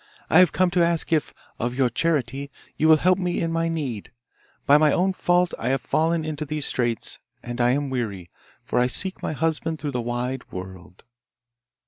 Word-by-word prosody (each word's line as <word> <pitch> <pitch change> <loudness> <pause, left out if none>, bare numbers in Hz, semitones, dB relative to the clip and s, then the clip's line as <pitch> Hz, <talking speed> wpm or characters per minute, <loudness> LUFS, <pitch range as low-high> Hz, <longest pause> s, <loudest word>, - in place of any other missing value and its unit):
I - - +7
have 180 -3 +6
come 185 -1 +2
to 175 -1 +3
ask 170 -1 0
if, 155 - +1 0.3
of 120 +1 -2
your 130 -1 +3
charity, 140 0 -1 0.3
you 155 - +2
will 160 -1 +7
help 185 +4 +2
me 180 -2 -1
in 165 - -1
my 165 0 0
need. 140 -11 -4 0.5
By 145 +1 +6
my 155 -1 +4
own 190 +5 +2
fault 175 -1 +1
have 125 +3 0
I - - +2
fallen 160 +3 0
into 155 -1 -4
these 150 -1 -3
straits, 120 -2 -1 0.2
and 120 0 -4
I 120 - +4
am 140 0 -1
weary, 100 -9 -4 0.3
for - - 0
I 125 - +3
seek 185 +9 0
my - - -2
husband 160 +1 -1
through 145 0 -4
the 125 -2 -2
wide 125 +2 -4
world. 90 -1 -9
145 Hz, 195 wpm, -24 LUFS, 125-165 Hz, 0.5 s, I